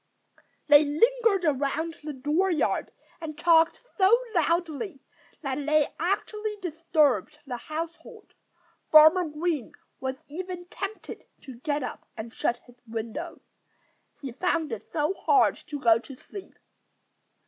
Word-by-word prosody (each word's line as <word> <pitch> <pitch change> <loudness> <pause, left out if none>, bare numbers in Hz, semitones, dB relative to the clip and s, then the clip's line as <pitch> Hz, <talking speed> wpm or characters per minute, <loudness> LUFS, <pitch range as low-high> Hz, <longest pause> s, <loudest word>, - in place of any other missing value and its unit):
They 295 0 +7
lingered 400 +5 +2
around 300 +3 0
the 305 - -4
dooryard 305 +6 0 0.3
and 310 -2 -6
talked 330 +5 +3
so 390 +5 +6 0.2
loudly 335 0 0 0.4
that 275 +1 -2
they 300 0 +2
actually 420 +4 -2
disturbed 310 - +1
the 250 -3 -4
household. 335 - -7 0.6
Farmer 315 +3 +7
Green 300 -4 -2 0.3
was 265 0 -4
even 360 +3 -6
tempted 400 +1 -7 0.2
to 255 -4 -11
get 290 +1 -1
up 250 - -7
and 225 +1 -7
shut 240 - 0
his 245 0 -20
window, 225 0 -5 0.8
he 270 -3 -6
found 325 +2 -1
it 225 - -7
so 305 +3 0
hard 395 0 +3
to 295 -3 -5
go 230 -3 +5
to 270 +3 -11
sleep. 385 +9 -11
310 Hz, 125 wpm, -27 LUFS, 275-355 Hz, 0.8 s, They